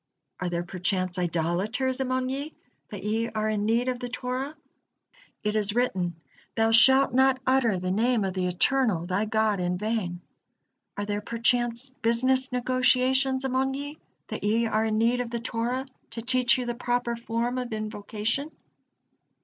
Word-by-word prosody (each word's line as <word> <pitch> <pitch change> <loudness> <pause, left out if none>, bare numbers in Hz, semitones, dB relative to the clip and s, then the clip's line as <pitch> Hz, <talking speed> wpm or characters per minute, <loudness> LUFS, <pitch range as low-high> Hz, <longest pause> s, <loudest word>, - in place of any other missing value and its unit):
Are 180 - -2
there 175 0 -2
perchance 185 0 -1
idolaters 180 - -1
among 255 -1 -1
ye, 280 +4 -4 0.3
that 200 -3 -7
ye 225 +2 -1
are 215 -1 -2
in 210 -1 0
need 235 +3 +2
of 250 -1 -1
the 245 -1 -5
Torah? 255 +4 -4 0.9
It 210 0 -1
is 210 0 0
written: 185 -8 0 0.4
'Thou 225 0 +2
shalt 265 +3 +6
not 265 0 +4
utter 255 -6 +3
the 185 0 -2
name 230 +2 +2
of 190 - -2
the 185 -1 -1
Eternal, 190 -1 +1
thy 185 +4 0
God, 215 -2 +1
in 180 0 -1
vain,' 200 -4 -2 0.8
Are 205 - -2
there 205 0 -2
perchance 240 +3 +1
business 260 +2 +1
negotiations 255 +1 +2
among 265 +1 0
ye, 290 +2 -6 0.3
that - - -5
ye 225 +3 +2
are 220 0 +1
in 215 -1 0
need 235 +2 +2
of 245 - -4
the 235 - -3
Torah 235 +3 -2 0.2
to 230 0 -6
teach 255 0 +4
you 250 - -3
the 240 - -2
proper 240 0 -1
form 235 +2 -2
of 250 -1 -5
invocation? 215 +5 -2
230 Hz, 165 wpm, -26 LUFS, 210-255 Hz, 0.9 s, shalt